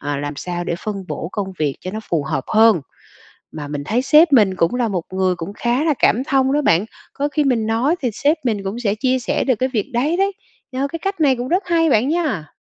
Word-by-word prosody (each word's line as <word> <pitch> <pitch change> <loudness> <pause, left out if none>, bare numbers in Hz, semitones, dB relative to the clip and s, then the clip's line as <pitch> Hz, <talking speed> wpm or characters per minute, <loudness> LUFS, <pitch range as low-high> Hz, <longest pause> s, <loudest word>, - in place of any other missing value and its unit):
ờ, 145 0 -3
làm 145 0 -4
sao 175 +1 -4
để 170 - -2
phân 200 -3 -4
bổ 165 - -4
công 195 -3 -3
việc 145 -3 0
cho 185 - -5
nó 215 +3 -5
phù 155 -4 0
hợp 135 -1 -2
hơn. 220 -5 +5 0.7
Mà 145 -2 -7
mình 145 -1 -4
thấy 235 +8 0
sếp 300 +3 +5
mình 200 -7 +4
cũng 165 +7 +1
là 245 -2 0
một 180 -5 -2
người 185 -1 +1
cũng 175 +4 -6
khá 240 +7 0
là 310 -3 +2
cảm 250 +4 +3
thông 270 -1 +2
đó 295 +1 +1
bạn. 175 -4 +3 0.3
Có 285 +1 -2
khi 295 0 0
mình 235 -5 +1
nói 245 +10 +1
thì 245 - 0
sếp 295 +9 +1
mình 210 -5 -1
cũng 195 +4 -4
sẽ 215 -4 0
chia 255 +3 0
sẻ 240 - -1
được 255 -4 +2
cái 260 +3 0
việc 220 +3 -2
đấy 280 +8 +1
đấy, 390 +2 +1 0.4
ơ, 270 +2 -1
cái 330 - -3
cách 390 0 -4
này 270 -4 +4
cũng 245 +2 -4
rất 365 +4 +1
hay 330 -2 +2
bạn 240 +2 +3
nha. 300 - -2
235 Hz, 255 wpm, -19 LUFS, 185-280 Hz, 0.7 s, hơn